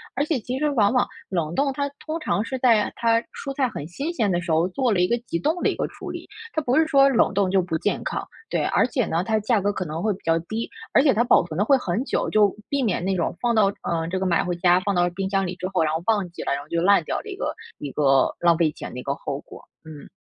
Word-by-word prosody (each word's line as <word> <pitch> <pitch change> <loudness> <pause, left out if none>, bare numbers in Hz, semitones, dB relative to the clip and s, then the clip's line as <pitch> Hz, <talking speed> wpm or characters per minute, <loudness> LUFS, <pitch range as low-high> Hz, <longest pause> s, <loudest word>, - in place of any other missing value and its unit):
而 275 - +1
且 305 -3 0
其 245 +3 -4
实 300 +1 +1
往 225 -6 +2
往 250 - +3 0.2
冷 170 -4 -2
冻， 275 -1 +1
它 280 +1 -2 0.2
通 315 +1 -2
常 255 - 0
是 260 - -3
在， 235 -5 +4
啊， - - -4
它 230 -1 +2
蔬 275 - -5
菜 265 -3 +2
很 180 -11 -6
新 280 - -4
鲜 220 - +1
的 175 - +1
时 175 0 -7
候 160 +1 +3
做 245 +4 0
了 190 - +1
一 180 - +3
个 235 - +2
急 - - -1
冻 320 - 0
的 - - +2
一 - - -2
个 - - -1
处 - - -9
理， - - -6 0.3
它 315 - 0
不 255 -2 +1
是 320 - +3
说 275 -3 +5
冷 240 -6 +2
冻 195 -2 +1
就 190 0 +4
不 175 -2 -2
健 205 - -1
康， - - -3 0.2
对， - - 0
而 - - +2
且 250 -7 0
呢， 170 +1 -1
它 220 +1 +1
价 220 +1 +2
格 205 +1 0
可 190 - -3
能 160 -1 -5
会 215 +1 +1
比 190 - -11
较 165 0 +2
低。 225 +1 -3 0.2
而 275 - +5
且 280 - +5
它 220 - +2
保 240 -7 +4
存 160 -2 -6
的 205 - +2
会 275 +3 +5
很 200 -3 -2
久， - - -1
就 205 -2 +3
避 280 -1 0
免 210 -8 0
那 190 +1 0
种 170 - -1
放 240 -1 +2
到 215 -3 +4 0.2
呃， 165 -1 -1
这 185 - -2
个 190 - -1
买 175 -2 +2
回 175 0 -2
家 175 +1 +4
放 200 +1 -1
到 175 0 +3
冰 190 +2 -4
箱 195 -1 +1
里 180 - -3
之 185 - -3
后， 185 - +1
然 155 -1 0
后 160 - -1
忘 205 -5 +1
记 170 - -8
了， - - 0
然 140 - -2
后 145 - -14
就 170 - 0
烂 195 -1 +4
掉 - - -2
了 - - -11
一 410 -3 -6
个 - - -3 0.2
一 145 -2 -6
个 135 -1 +3
浪 170 -1 +4
费 160 -2 +2
钱 - - -8
的 125 - -6
一 - - -7
个 140 - -2
后 140 0 -5
果， - - -13 0.2
嗯。 155 -2 -10
200 Hz, 325 characters per minute, -23 LUFS, 170-250 Hz, 0.3 s, 说